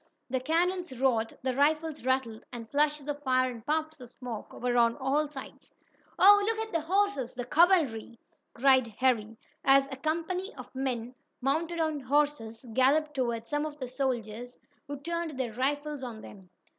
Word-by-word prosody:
The 260 - +1
cannons 340 0 0
roared, 230 -4 +1
the 260 -1 -1
rifles 305 +1 +1
rattled 255 -4 -1
and 230 -2 -7
flashes 295 0 +1
of 290 0 -3
fire 255 -2 +2
and 230 -2 -10
puffs 315 +1 -2
of 245 - -10
smoke 245 -4 -8
were 245 0 -2
on 235 -1 +3
all 285 +3 0
sides. 275 -2 -11 0.4
"Oh, 410 +2 +8
look 445 +2 0
at 445 0 -4
the 330 - +1
horses 320 -8 0
the 245 -1 -4
cavalry!" 285 - +3 0.4
cried 260 -1 +4
Harry, 225 -4 +1 0.3
as 275 0 +5
a - - -4
company 335 +7 -2
of - - -11
men, 250 -3 -3 0.3
mounted 320 +6 -1
on 315 -2 0
horses, 270 -4 0
galloped 295 +5 +3
toward 235 -4 -2
some 295 +3 -1
of 305 -1 -5
the 260 -3 -5
soldiers, 245 -2 -3 0.3
who 285 -1 -6
turned 335 -2 -3
their 240 -4 -2
rifles 290 +3 -1
on 235 -4 -7
them. 190 -3 -13
270 Hz, 170 wpm, -29 LUFS, 245-310 Hz, 0.4 s, Oh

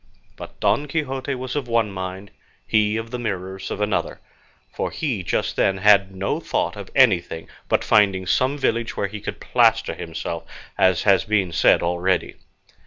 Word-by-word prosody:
But - - -11
Don 115 +9 +1
Quixote 135 -2 -2
was 130 +1 -5
of 140 -4 -2
one 115 -3 +1
mind, 95 +1 -6 0.3
he 105 0 +2
of 115 0 -5
the 125 - -4
Mirrors 95 -4 -4
of - - -4
another, 105 -1 -1 0.5
for - - -2
he 130 -11 -2
just 85 - -1
then 95 0 +2
had 100 0 +5
no 95 +1 -2
thought 90 - -2
of 100 -2 -8
anything 95 -10 +3 0.2
but - - +2
finding 100 -3 +3
some 130 +9 +1
village 115 -4 -1
where - - 0
he 105 +1 -6
could - - -6
plaster - - +2
himself, - - -5 0.3
as 95 -3 +3
has 100 -2 +4
been 100 -5 +1
said 80 - +4
already. 90 +2 0
105 Hz, 170 wpm, -22 LUFS, 95-115 Hz, 0.5 s, had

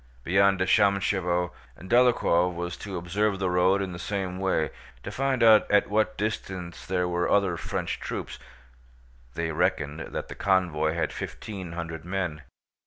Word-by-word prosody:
Beyond 95 +3 +3
Shámshevo, 95 -3 +2 0.3
Dólokhov 95 -5 +3
was 85 0 -4
to 100 -3 -6
observe 100 +4 0
the 95 -2 -1
road 90 +2 +3
in 95 - -4
the 85 - -7
same 95 -1 -3
way, 95 -5 0 0.3
to - - -5
find 135 -2 0
out 110 -2 +6
at 105 0 +3
what 110 +1 +1
distance 95 -5 -4
there 90 -1 0
were 90 0 0
other 100 -4 +3
French - - -3
troops. - - -5 1.0
They 85 -1 -2
reckoned 80 -3 0
that - - -5
the - - -7
convoy 85 -5 +1
had 80 -3 -1
fifteen 95 -6 -6
hundred 85 -1 -5
men. 90 -4 -3
90 Hz, 150 wpm, -27 LUFS, 85-100 Hz, 1.0 s, out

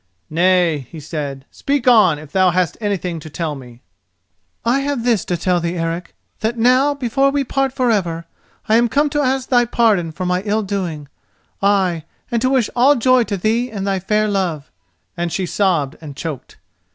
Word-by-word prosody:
"Nay," 170 -5 +2
he 165 - -9
said, 145 -3 -5
"speak 275 -2 -2
on, 210 -10 +6
if 150 -1 -12
thou 185 -1 +4
hast 180 -1 0
anything 185 -5 -2
to 155 - -10
tell 160 0 -3
me." 125 -3 -12 0.8
"I 245 +4 +3
have 275 -3 -2
this 235 -6 +2
to 175 - -1
tell 180 +1 +1
thee, 170 +1 -3
Eric; 165 +1 -3 0.2
that 225 +2 -1
now, 255 +5 +3
before 275 +1 +1
we 280 0 0
part 270 +1 0
for 255 -2 +1
ever, 170 -6 -1 0.4
I 220 - +4
am 235 0 +3
come 290 +4 +1
to 295 0 +1
ask 265 -1 0
thy 245 -2 +4
pardon 215 -8 +2
for 180 +4 -5
my 180 0 0
ill 215 +2 0
doing—ay, 185 0 -2 0.3
and 235 -1 0
to 255 - +2
wish 260 -5 +1
all 265 +4 +5
joy 255 0 +3
to 200 -2 -3
thee 225 +6 0
and 200 -4 -4
thy 195 -1 0
fair 210 +3 +1
love," 180 -8 -2 0.4
and 170 -1 -2
she 190 +1 -1
sobbed 170 -7 0
and 145 -3 -9
choked. 155 -4 -6
195 Hz, 190 wpm, -19 LUFS, 170-240 Hz, 0.8 s, on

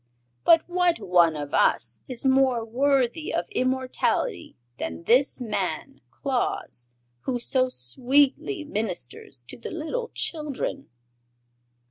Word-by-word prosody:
But 330 -1 +5
what 355 -1 +2
one 175 -3 +3
of 145 -1 -6
us 115 -1 +2
is 255 0 -4
more 260 -3 +3
worthy 275 - +1
of - - -1
immortality 260 - -1 0.2
than 80 +1 -5
this 265 +3 +3
man 195 -9 -3
Claus, 240 - -3 0.4
who 255 - 0
so 255 +1 +1
sweetly 270 - +2
ministers 175 - -5
to - - -10
the - - -6
little 345 +10 -4
children?" 300 - -3
255 Hz, 110 wpm, -25 LUFS, 185-295 Hz, 0.4 s, But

